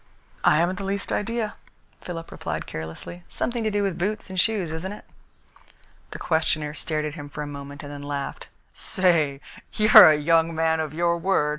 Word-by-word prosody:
"I - - +5
haven't 175 +3 +1
the - - -4
least 200 +1 -2
idea," 225 0 -1 0.5
Philip 165 -2 -7
replied - - -4
carelessly. 80 - -8
"Something 235 -1 -2
to 215 - +1
do 205 -1 0
with 190 -3 -2
boots 205 +2 -2
and 185 - -2
shoes, 195 -6 +2
isn't 165 +4 -4
it?" 210 - -10 1.1
His - - -7
questioner 155 -2 0
stared 155 -1 -2
at 150 - -4
him 145 -2 -8
for 150 - -5
a - - -5
moment 140 0 -8
and 145 - -8
then 145 0 -7
laughed. 145 -1 -5 0.3
"Say, 160 -7 +1 0.3
you're 215 -6 +9
a 155 - +4
young 165 +2 +2
man 160 0 +1
of 155 -2 -2
your 170 0 +1
word!" 170 -4 +1
165 Hz, 185 wpm, -24 LUFS, 150-190 Hz, 1.1 s, you're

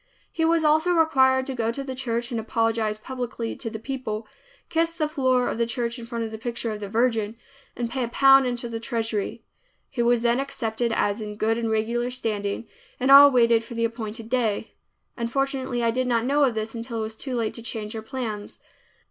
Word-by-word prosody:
He 325 - -1
was 330 0 +3
also 315 +4 +4
required 265 -5 +4
to 270 - -4
go 230 -2 0
to 275 +4 -4
the 265 -1 -5
church 240 -1 -2
and 235 - -1
apologize 225 -1 0
publicly 240 -1 -5
to 230 - -4
the 220 - -6
people, 225 -3 -4 0.4
kiss 330 +1 0
the 310 -3 0
floor 260 -5 +1
of - - -3
the 235 - +2
church 235 0 -2
in 230 - -8
front 235 -1 -3
of 220 - -4
the 220 - -7
picture 235 0 -3
of 210 - -5
the 205 -1 -6
Virgin, 225 -1 +1 0.4
and 240 - -2
pay 255 +2 -2
a - - -1
pound 270 +2 +6
into 240 -1 -3
the 230 -1 -4
treasury. 225 -2 -3 0.5
He 255 - -1
was 235 0 +3
then 235 +1 +3
accepted 235 -4 -2
as 205 -1 0
in 210 -1 -5
good 220 +2 +1
and 230 -1 -2
regular 230 +3 0
standing, 220 -3 -3 0.3
and 260 +2 +2
all 285 +1 +11
waited 235 -3 +4
for 235 +1 -9
the 230 0 +1
appointed 225 -1 -5
day. 225 -3 -1 0.4
Unfortunately 260 0 -1
I 230 - +3
did 255 +2 -1
not 235 -1 +1
know 285 +2 +3
of 245 -4 0
this 220 0 -3
until 230 0 -5
it - - -1
was 220 0 -4
too 260 +2 -4
late 225 -2 -1
to 235 - -7
change 220 -2 -5
our 220 - -4
plans. 220 -4 -5
235 Hz, 215 wpm, -25 LUFS, 225-260 Hz, 0.5 s, all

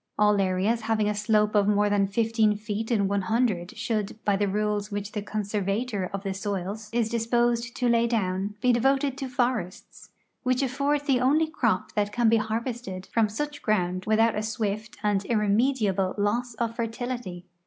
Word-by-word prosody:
All 210 -1 +4
areas 195 +5 +1
having 220 -2 +1
a 210 - +1
slope 210 0 +2
of 205 -1 +3
more 210 0 +3
than 205 -1 +2
fifteen 220 0 +2
feet 215 +1 -4
in 205 -5 +2
one 200 0 0
hundred 205 -4 0
should, 215 -2 -2
by 205 - +3
the 205 +1 +1
rules 210 +1 -1
which 205 0 -4
the 210 - -3
conservator 205 0 -2
of 195 0 -4
the 195 -1 -2
soils 200 +2 -4
is 230 -1 +1
dis 230 0 -2
posed 235 0 +1
to 250 - 0
lay 235 0 +3
down, 200 -3 -1
be 250 0 +4
devoted 270 +3 +2
to 270 - -4
forests, 245 -8 -3 0.3
which 255 +1 +1
afford 280 +3 0
the 270 -4 +3
only 295 +5 +3
crop 315 +3 -1
that 205 -1 -1
can 235 +1 +3
be 230 - +4
harvested 220 -3 -3
from 225 -2 +3
such 295 +7 -4
ground 185 -3 0
without 220 +1 +3
a 210 - -2
swift 215 -1 -3
and 205 -2 +1
irremediable 210 -3 +1
loss 225 +4 0
of 230 0 -2
fertility. 230 -6 -4
215 Hz, 180 wpm, -26 LUFS, 205-235 Hz, 0.3 s, All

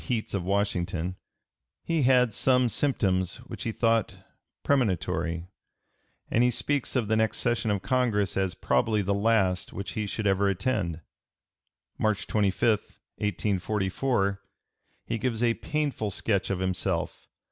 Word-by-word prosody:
305) 125 -4 0
heats 110 - -6
of 100 -3 -1
Washington, 90 -2 -1 0.7
he 165 -2 0
had 125 -3 +4
some 125 +2 +3
symptoms 95 -8 0
which 125 +1 -7
he 115 - 0
thought 115 -1 +1 0.5
premonitory, 85 - 0 0.9
and 120 - +4
he 125 - +4
speaks 140 +3 0
of 120 -5 +1
the 110 - +2
next 110 0 +1
session 120 -2 0
of 100 -2 0
Congress 115 -7 +1
as 95 -2 0
probably 105 - +1
the 100 +1 0
last 100 -3 +1
which 100 +2 -5
he 105 -1 -3
should 110 +1 -3
ever 100 0 +3
attend. 95 -6 -1 1.0
March 110 -1 +1
25, 105 +1 +1 0.2
1844, 100 +1 0 0.6
he 115 0 -2
gives 120 -2 -1
a 115 -1 +4
painful 145 -6 -2
sketch 100 0 0
of 95 - 0
himself. 95 -1 -2
105 Hz, 135 wpm, -27 LUFS, 95-120 Hz, 1.0 s, had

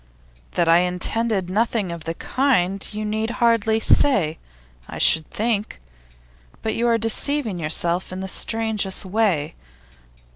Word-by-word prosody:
'That 170 - +1
I 165 +1 +6
intended 185 +3 -1
nothing 210 -1 0
of 170 -2 -7
the 165 - -3
kind, 195 -9 0
you 215 0 -4
need 220 +1 -2
hardly 225 -2 +2
say, 200 - +3 0.5
I - - -7
should 160 -1 +4
think. 215 - -2 0.8
But 220 - -1
you 235 +2 0
are 230 -1 +3
deceiving 225 -1 -1
yourself 170 +3 -1
in 185 - -6
the 190 - -4
strangest 215 -2 -1
way. 185 -7 0
210 Hz, 135 wpm, -22 LUFS, 180-225 Hz, 0.8 s, I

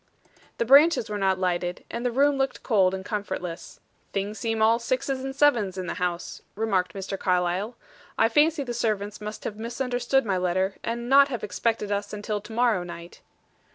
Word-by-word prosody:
The 235 - 0
branches 280 -2 +5
were 205 - -2
not 190 -1 +2
lighted, 180 -1 -2
and 235 - -4
the 250 - +1
room 280 +4 +3
looked 270 0 -1
cold 190 -5 +3
and 190 0 -7
comfortless. 190 -5 -5 0.3
"Things 200 +2 -3
seem 225 -1 -1
all 225 +2 +4
sixes 260 +2 -2
and 270 0 -5
sevens 235 -10 +3
in 185 - -3
the - - -3
house," 175 -1 -3
remarked 195 -5 0
Mr. 195 0 -5
Carlyle. 185 +5 0 0.4
"I 225 - +5
fancy 295 +5 +3
the 245 -2 -4
servants 210 -3 -2
must 210 +1 -6
have 210 - -5
misunderstood 245 +3 0
my 195 -3 0
letter, 185 +2 0
and 235 +1 -3
not 275 +2 +7
have 245 -5 -5
expected 210 +1 -1
us 205 0 -2
until 210 0 -3
to 210 +2 -12
morrow 230 -4 +2
night." 170 -1 -9
215 Hz, 185 wpm, -26 LUFS, 190-245 Hz, 0.4 s, not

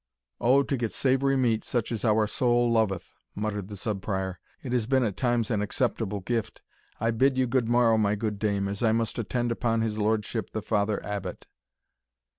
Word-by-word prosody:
"Oh, 130 +4 +4
to 135 - -1
get 115 -3 -2
savoury 135 +1 +2
meat, 115 -4 +1
such 120 -2 -2
as 115 -3 -3
our 110 -1 +3
soul 120 +2 +2
loveth," 110 -6 0 0.2
muttered 105 -2 -3
the 105 -1 -8
Sub 100 0 -3
Prior; 95 -3 -3 0.2
"it 130 - -5
has 120 -3 0
been 130 0 +3
at 105 -5 -1
times 120 -3 0
an 105 -2 +1
acceptable 105 -2 -1
gift. 115 +3 -3 0.4
I 115 +2 +1
bid 130 +4 +2
you 130 - +3
good 125 -1 0
morrow, 120 -2 +4
my 105 -1 +2
good 105 -1 -3
dame, 100 -2 0
as 100 0 -4
I 110 -2 +3
must 115 +1 -1
attend 120 +2 -1
upon 115 -1 0
his 110 -1 -2
lordship 110 0 -1
the 110 - -3
Father 105 -1 0
Abbot." 100 -3 -5
110 Hz, 195 wpm, -27 LUFS, 105-120 Hz, 0.4 s, Oh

